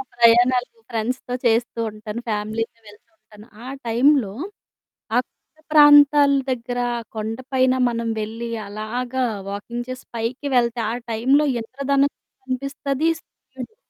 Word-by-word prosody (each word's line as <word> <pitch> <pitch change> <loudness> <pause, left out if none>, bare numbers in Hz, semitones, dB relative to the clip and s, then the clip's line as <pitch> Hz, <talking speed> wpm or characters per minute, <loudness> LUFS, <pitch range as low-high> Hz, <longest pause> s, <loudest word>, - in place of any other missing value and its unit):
ప్రయాణాలు 240 +1 +5
మా 455 - -26
ఫ్రెండ్స్‌తో 245 +2 -3
చేస్తూ 235 +1 +1
ఉంటాను 215 +2 -7
ఫ్యామిలీతో 220 +2 -3
వెళ్తూ 205 0 -17
ఉంటాను 210 -4 -17 0.2
ఆ - - -7 0.2
టైంలో, 245 -2 +3 0.8
ఆ - - +5
కొండ - - -51
ప్రాంతాల 290 -1 +7 0.2
దగ్గర 245 0 -3 0.4
కొండపైన 255 +4 0 0.2
మనం 230 -1 -3
వెళ్లి 225 +2 -5 0.2
అలాగా 245 +5 -3 0.2
వాకింగ్ 235 +5 -5
చేసి 255 0 -7
పైకి 240 +5 -3
వెళ్తే 235 -1 +2
ఆ - - -2 0.2
టైంలో 265 +7 +3
ఇంద్రధనస్సు 275 +4 0 0.2
కనిపిస్తది 275 +3 -2
సుర్యుడు 260 - -12
245 Hz, 115 wpm, -22 LUFS, 225-265 Hz, 0.8 s, ప్రాంతాల